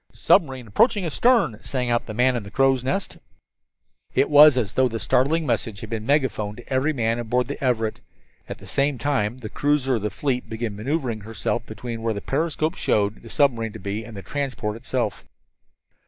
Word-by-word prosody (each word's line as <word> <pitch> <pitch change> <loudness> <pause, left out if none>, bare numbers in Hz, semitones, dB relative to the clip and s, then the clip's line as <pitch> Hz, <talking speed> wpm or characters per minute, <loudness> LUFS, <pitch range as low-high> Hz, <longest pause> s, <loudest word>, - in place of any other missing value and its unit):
"Submarine 130 -6 +2
approaching 205 - +2
astern!" 170 - +2
sang 125 -2 -2
out 120 - 0
the 110 - -6
man 125 +2 +3
in 120 - -1
the 100 - -10
crow's 135 +2 +2
nest. 190 +10 -2 1.0
It - - +2
was 145 -2 +8
as 110 -7 -1
though 130 0 +3
the 115 -2 -4
startling 155 +9 +1
message 115 -5 -2
had 110 -1 -8
been 110 0 -4
megaphoned 125 -8 0
to 120 - -8
every 130 +4 +2
man 115 -4 0
aboard 120 +1 0
the 140 0 -6
Everett. 115 -4 0 0.5
At - - -5
the - - -14
same 140 -1 0
time 125 -5 -1
the 120 -4 -7
cruiser 145 +2 +1
of - - -5
the 105 - -1
fleet 125 +4 -2
began 110 -2 -4
maneuvering 120 0 -2
herself 115 +2 -3
between 115 +1 -6
where 115 -1 -1
the - - -3
periscope 155 - -1
showed 105 - 0
the 115 - -12
submarine 115 -7 +1
to - - -8
be 100 +3 -4
and 110 -2 -10
the 100 - -7
transport 130 -3 -3
itself. 115 - -3
125 Hz, 195 wpm, -23 LUFS, 110-140 Hz, 1.0 s, was